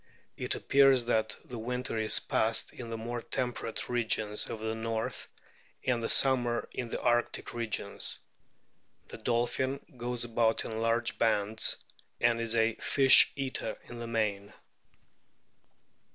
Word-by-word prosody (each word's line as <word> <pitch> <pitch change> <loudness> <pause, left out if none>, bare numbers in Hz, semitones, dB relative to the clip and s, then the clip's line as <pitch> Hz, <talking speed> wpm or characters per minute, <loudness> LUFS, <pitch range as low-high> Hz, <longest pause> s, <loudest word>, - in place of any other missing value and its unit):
It - - -2
appears 135 -3 +4
that 110 -2 0
the 120 -2 -7
winter 125 +2 -3
is 110 -1 +5
passed 110 +1 0
in 120 -2 -8
the 115 - -4
more 120 +1 -4
tem 125 0 -2
perate 115 - -5
regions 110 -3 -1
of 110 - -5
the 110 0 -3
north, 110 0 -3 0.6
and 125 -2 +1
the 115 - -2
summer 125 -3 +2
in 120 -2 -5
the - - -3
arctic 120 0 0
regions. 110 -3 -2 0.9
The - - -9
dolphin 120 +4 -1 0.2
goes 120 0 -3
about 115 -1 +1
in 110 0 -4
large 115 +1 0
bands, 110 -1 +2 0.4
and 120 -1 +2
is 115 0 -1
a 115 0 +3
fish 135 -1 +6
eater 130 -5 -2
in 120 - -10
the 120 - -5
main. 105 -3 -2
115 Hz, 140 wpm, -30 LUFS, 110-120 Hz, 0.9 s, fish